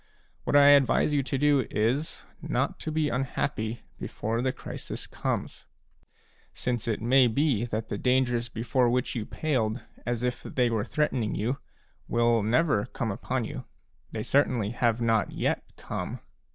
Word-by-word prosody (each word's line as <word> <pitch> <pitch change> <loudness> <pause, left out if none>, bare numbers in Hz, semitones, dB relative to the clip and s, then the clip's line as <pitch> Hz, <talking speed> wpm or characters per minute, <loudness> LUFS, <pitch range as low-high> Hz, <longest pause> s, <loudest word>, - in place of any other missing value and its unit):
What - - +1
I 145 0 +8
advise 145 +1 +5
you 145 - +3
to 135 0 -2
do 140 -3 +3
is, 125 +9 -1 0.2
not - - -1
to 155 - -4
be 155 -1 +1
unhappy 120 -3 -2 0.2
before 115 +2 -2
the 130 +1 +1
crisis - - -7
comes; - - -4 0.9
since 120 -3 -2
it 110 -1 -1
may 130 +2 +5
be 120 -1 +1
that 110 -1 -4
the - - -3
dangers 125 -2 +1
before 120 +2 +1
which 125 +1 0
you 110 -4 -3
paled 125 -7 -1 0.2
as 120 0 -2
if 125 0 -1
they 125 -2 0
were 110 -2 0
threatening 130 -8 0
you, 125 +7 -1 0.5
will 120 -1 +3
never 115 0 +2
come 120 -3 -3
upon 125 +4 -2
you; 130 +1 -6 0.5
they - - -3
certainly 125 -7 +2
have 120 -1 +1
not 115 -2 +2
yet - - 0 0.2
come. - - -5
120 Hz, 155 wpm, -28 LUFS, 115-135 Hz, 0.9 s, I